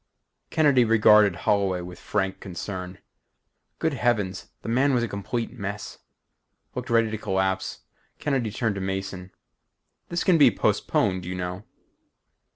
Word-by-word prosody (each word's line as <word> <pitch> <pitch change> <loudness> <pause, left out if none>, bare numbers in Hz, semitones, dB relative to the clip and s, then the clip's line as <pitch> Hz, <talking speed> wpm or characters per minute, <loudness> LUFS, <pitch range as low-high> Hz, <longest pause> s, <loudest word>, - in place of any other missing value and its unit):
Kennedy 145 -5 +4
regarded 105 -3 +5
Holloway 95 -3 +2
with 90 0 -9
frank 95 0 -2
concern. 90 0 -6 0.8
Good 160 -1 0
heavens 110 -7 0 0.2
the - - -7
man 130 +4 +3
was 120 - +2
a - - 0
complete 115 +4 -3
mess. 100 -3 -6 0.7
Looked 125 +1 -5
ready 115 -1 +3
to 110 - -2
collapse. 95 -1 -1 0.4
Kennedy 135 -6 -1
turned 110 +1 -1
to 100 - -5
Mason. 95 -1 -4 0.8
"This 170 - -1
can 175 -4 +4
be 140 -4 +8
postponed, 95 -3 +1
you 90 +1 -4
know." 90 +3 -5
100 Hz, 135 wpm, -25 LUFS, 95-120 Hz, 0.8 s, be